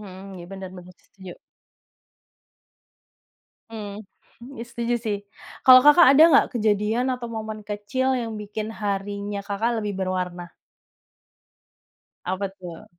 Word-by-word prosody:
mhm. 195 -1 -11
Iya, 175 - -9
benar 190 -1 -7
benar 180 0 -13
setuju. 190 -2 -13 2.4
Hmm, 210 -1 -7 0.6
ya 230 - -5
setuju 235 0 -2
sih. 215 -3 -3 0.4
Kalau 255 -1 +9
Kakak 295 -1 +8
ada 280 +3 +7
enggak 310 -5 +5
kejadian 215 +3 +1
atau 240 -2 -7
momen 220 -1 -6
kecil 215 +6 -2
yang 230 -2 -4
bikin 210 0 -5
harinya 200 0 -3
Kakak 225 +3 -1
lebih 210 -2 -3
berwarna? 180 -2 -4 1.8
Apa 190 +2 -2
tuh? 175 -3 -10
210 Hz, 115 wpm, -23 LUFS, 195-230 Hz, 2.4 s, Kalau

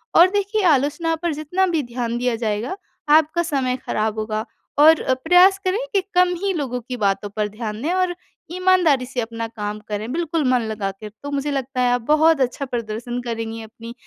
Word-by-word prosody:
और 350 +2 +8
देखिए, 410 +1 0
आलोचना 315 +2 +2
पर 335 0 -2
जितना 310 +6 0
भी 330 -4 0
ध्यान 240 -1 -3
दिया 245 -1 0
जाएगा, 225 - -2 0.3
आपका 315 +2 +4
समय 270 -6 0
खराब 215 0 -1
होगा 215 0 -2 0.3
और 315 +2 +7
अ, 260 - +1
प्रयास 360 +8 +5
करें 370 +3 +1
कि 395 - +3
कम 360 0 +4
ही 395 -1 +1
लोगों 265 -7 -3
की 250 +2 -6
बातों 205 -1 0
पर 210 -1 0
ध्यान 210 +1 -6
दें 310 +6 -1
और 365 -1 0 0.4
ईमानदारी 355 -7 +3
से 250 0 -5
अपना 230 0 -4
काम 210 -2 -5
करें, 215 +3 -3
बिल्कुल 330 -1 -1
मन 250 -2 +3
लगा 205 -2 -2
कर। 210 +2 -10
तो 285 - -5
मुझे 285 +1 -1
लगता 270 -2 -2
है 245 -1 +3
आप 245 - 0
बहुत 315 -1 +4
अच्छा 260 +2 -1
प्रदर्शन 240 0 -4
करेंगी 225 -1 -4
अपनी 230 +1 -10
255 Hz, 195 wpm, -21 LUFS, 225-325 Hz, 0.4 s, और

